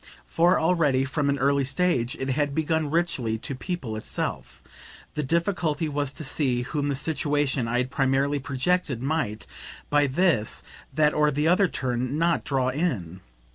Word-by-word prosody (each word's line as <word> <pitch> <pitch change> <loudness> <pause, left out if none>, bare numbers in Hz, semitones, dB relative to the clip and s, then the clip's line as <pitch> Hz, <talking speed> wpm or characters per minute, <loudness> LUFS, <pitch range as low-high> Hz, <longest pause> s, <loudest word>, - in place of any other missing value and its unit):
For 170 - +3
already, 155 -6 +2
from 140 +1 -1
an 140 - +1
early 140 +1 +2
stage, 135 -3 0
it 135 - -2
had 145 +1 0
begun 160 -1 0
richly 140 -9 0
to 135 +5 -5
people 135 - -4
itself: 110 - -5 0.5
the 150 - -2
difficulty 165 +1 0
was 145 -2 -2
to 155 - -7
see 130 -3 0
whom 145 +3 -2
the 140 - 0
situation 145 -3 0
I 120 +2 0
had 125 +1 -1
primarily 135 +1 +1
projected 140 0 -1
might, 135 -8 -1 0.5
by 145 -1 +4
this, 135 - +1 0.3
that 150 +1 +3
or 150 0 +3
the 150 +2 0
other 185 +3 +4
turn, 130 -1 -2
NOT 170 +1 +2
draw 130 -2 0
in. 120 - -2
145 Hz, 160 wpm, -25 LUFS, 130-160 Hz, 0.5 s, by